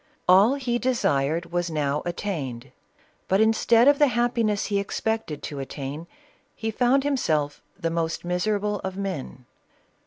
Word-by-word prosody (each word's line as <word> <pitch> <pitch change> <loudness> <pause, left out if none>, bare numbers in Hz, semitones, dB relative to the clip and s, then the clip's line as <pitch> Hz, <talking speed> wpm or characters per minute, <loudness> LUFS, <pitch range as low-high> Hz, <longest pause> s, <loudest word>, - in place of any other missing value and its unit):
All 195 +8 +6
he 245 -3 -1
desired 170 - 0
was 175 0 -1
now 150 -2 -1
attain 155 -10 -4
ed, - - -21 0.6
but 190 - +2
instead 225 +2 +4
of 285 0 +5
the 295 - +6
happiness 235 -4 +1
he 200 -2 0
expected 200 -6 -3
to 145 - -5
attain 140 +4 -6 0.5
he 225 0 -3
found 250 +4 +2
himself 155 - 0 0.2
the 165 - -1
most 165 0 -2
miserable 205 +3 0
of 190 0 -5
men. 160 -10 -5
195 Hz, 145 wpm, -25 LUFS, 155-225 Hz, 0.6 s, All